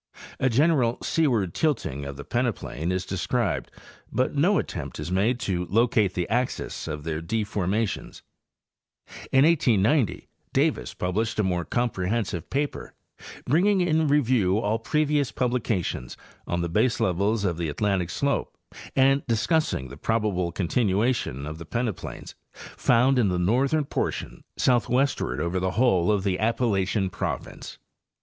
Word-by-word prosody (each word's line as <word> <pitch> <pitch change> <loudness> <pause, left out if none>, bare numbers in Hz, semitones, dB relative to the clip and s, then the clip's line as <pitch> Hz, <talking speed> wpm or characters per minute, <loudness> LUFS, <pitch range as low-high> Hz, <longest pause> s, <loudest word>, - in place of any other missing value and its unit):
A 130 - +2
general 130 -2 +3
seaward 120 - +1
tilting 70 - -1
of 70 0 -6
the 70 - -7
peneplain 110 - -2
is 90 0 -1
described, 95 +2 -1 0.4
but 130 - 0
no 175 +8 +3
attempt 70 -6 -4
is 85 - -4
made 110 +7 +1
to 90 -2 -1
locate 110 -2 +2
the 90 -1 -1
axes 120 -4 -2
of 75 -2 -5
their 80 0 -3
deformations. 105 +2 -2 1.1
In 135 +1 +5
1890 125 - +2 0.3
Davis - - 0
published 110 +6 -1
a - - +3
more 90 -2 0
comprehensive 105 -6 -1
paper,} 145 +2 -3 0.5
bringing 190 +8 +3
in 160 -3 +2
review 125 -9 +3
all 110 +1 0
previous 150 +1 +1
publications 120 -7 -2 0.3
on 85 0 -1
the 85 - -1
base 110 +8 +1
levels 100 +4 +1
of 85 -3 0
the 85 -2 -2
Atlantic 95 +1 0
slope 140 +9 -1 0.4
and 135 +1 +4
discussing 115 - 0
the 70 - -10
probable 100 -3 0
continua 105 +6 +1
tion 70 - -4
of 75 +1 -6
the 85 - -8
peneplains, 115 0 -4 0.2
found 125 +2 +2
in 115 - +3
the 90 - 0
northern 130 - +2
portion - - -3
southwest 130 +2 +2
ward 65 +2 -2
over 85 +4 -1
the 95 +2 -2
whole 105 -7 +3
of 100 -3 +1
the 95 -2 0
Appalachian 105 -4 +1
province. - - -5
110 Hz, 140 wpm, -25 LUFS, 90-130 Hz, 1.1 s, In